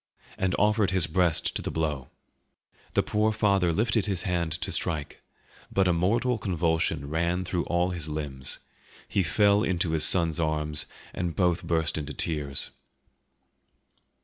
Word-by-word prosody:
and 95 0 0
offered 105 -1 +3
his 95 -3 +2
breast 85 0 +1
to - - -1
the - - -4
blow. 75 -5 -2 0.9
The - - +3
poor 105 +1 +1
father 100 -5 +2
lifted 110 +4 +1
his 95 -4 -2
hand 85 -4 -1
to 85 - 0
strike; 75 -5 -1 0.5
but 95 -1 +2
a 90 - +3
mortal 115 +8 +1
convulsion 80 -5 0
ran 85 +4 -1
through 90 -1 -2
all 90 +1 +1
his 85 -4 -4
limbs; 70 -3 -4 0.5
he 100 - +1
fell 100 +5 +3
into 90 -5 0
his 80 -1 +1
son's 85 -2 +4
arms, 75 -1 0 0.3
and 85 -2 -3
both 90 -3 +2
burst 80 -2 0
into 75 -1 -6
tears. 70 -4 -2
85 Hz, 150 wpm, -27 LUFS, 80-95 Hz, 0.9 s, son's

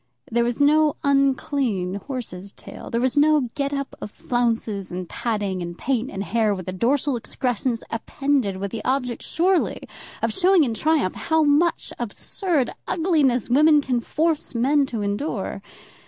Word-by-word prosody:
There 235 +1 +2
was 240 +2 -2
no 300 +1 +4
unclean 270 -8 +1
horse's 200 -8 -6
tail. - - -10
There 230 - 0
was 255 0 +1
no 295 -4 +3
get 280 -1 -2
up 275 -1 -4
of - - -5
flounces, 225 -5 -2
and 180 0 -5
padding, 205 -5 -2
and 175 0 -6
paint, 260 -1 -1
and 195 - -4
hair, 220 -2 +1
with 185 -1 -8
a - - -2
dorsal 260 +8 +1
excrescence 240 0 -2
appended 245 -3 -1
with 200 0 -4
the 225 - -5
object 250 -2 -1
surely 360 +2 0 0.4
of - - +1
showing 375 -2 +4
in 240 -5 -1
triumph 300 - +1
how 320 -1 +1
much 300 +4 +2
absurd 270 - -2 0.2
ugliness 305 - +2
women 300 +4 +5
can 255 -4 -1
force 310 0 -1
men 275 +4 +3
to 225 -5 -3
endure. 205 +10 -3
255 Hz, 155 wpm, -23 LUFS, 220-290 Hz, 0.4 s, women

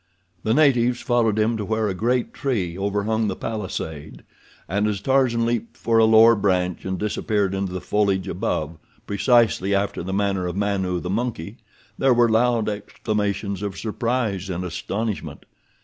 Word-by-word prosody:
The 110 +2 +1
natives 125 -5 +3
followed 115 -3 +1
him 110 +2 +1
to 105 - -3
where 110 +1 0
a 100 - -1
great 120 +6 0
tree 100 -12 -2
overhung 105 +3 0
the 95 - -2
palisade, 80 -8 -5 0.4
and 100 +2 0
as 105 -2 -1
Tarzan 125 -1 +2
leaped 115 -1 -2
for 115 -1 +2
a 110 - +6
lower 110 +1 +7
branch 90 -3 0
and 95 0 -2
disappeared 105 -2 -1
into 95 -1 -2
the 90 - -3
foliage 100 -3 0
above, 80 -3 -3 0.3
precisely 100 -2 +2
after 100 +1 -1
the 90 +3 -5
manner 95 -2 0
of 90 - -4
Manu, 95 -3 -1
the 90 - -4
monkey, 110 -2 -3 0.4
there 135 -2 +4
were 120 0 +5
loud 115 0 +2
exclamations 105 -1 -2
of 100 -2 -4
surprise 110 -3 -2
and 90 0 -3
astonishment. 100 +5 -4
105 Hz, 160 wpm, -23 LUFS, 95-115 Hz, 0.4 s, lower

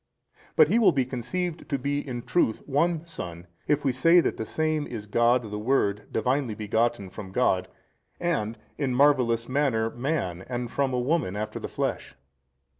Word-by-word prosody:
But 155 - +7
He 225 +6 +4
will 225 - +6
be 135 -2 +1
conceived 160 +8 -4
to 140 - 0
be 140 +2 -1
in 125 -4 -5
truth 145 -11 +1
One 160 +3 +1
Son, 85 - -7 0.2
if 145 -1 +1
we 135 - +3
say 165 +8 +5
that - - +1
the 110 - -5
Same 155 -1 0
is 110 -4 -6
God 120 +4 +3
the 105 -1 -5
|278 - - -7
Word 105 -5 +1
Divinely 125 0 0
begotten 110 -1 0
from 95 -1 -8
God, 95 -5 +1 0.5
and 135 -11 -1 0.2
in 135 -4 0
marvellous 125 -4 +3
manner 130 -5 +1
man 120 - -2
and 120 -1 -3
from 140 -1 0
a 125 - 0
woman 125 - 0
after 105 +1 -4
the - - -5
flesh. - - -3
125 Hz, 180 wpm, -26 LUFS, 110-145 Hz, 0.5 s, But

